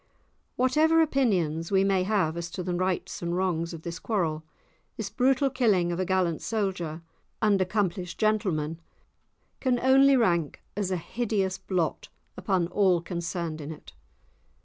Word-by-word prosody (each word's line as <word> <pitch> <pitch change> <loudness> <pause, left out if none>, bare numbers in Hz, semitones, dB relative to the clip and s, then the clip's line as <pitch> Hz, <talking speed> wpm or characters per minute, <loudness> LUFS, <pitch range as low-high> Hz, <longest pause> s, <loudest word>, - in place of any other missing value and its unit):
Whatever 305 +6 +3
opinions 190 - +1
we 195 -1 +4
may 195 -1 +2
have 185 -5 +1
as 170 0 -4
to 180 +2 -5
the 180 0 -2
rights 185 +1 -2
and 170 0 -2
wrongs 170 -3 -1
of 165 -2 -9
the 170 0 -5
quarrel, 165 -8 -1 0.6
this 215 -3 -4
brutal 265 +1 +2
killing 205 -9 +2
of 170 - -3
a 185 - 0
gallant 180 -3 0
soldier 185 -7 -2 0.4
and 205 -3 +3
accomplished 185 -2 -1
gentleman 170 -8 0 0.8
can 255 -2 +1
only 270 +2 +5
rank 170 - +1 0.2
as 200 -2 -1
a 185 - 0
hideous 195 0 -2
blot 175 -5 -2 0.3
upon 185 -1 0
all 190 -4 +3
concerned 170 -2 -4
in 145 +2 -6
it. 155 - -12
185 Hz, 150 wpm, -27 LUFS, 170-215 Hz, 0.8 s, only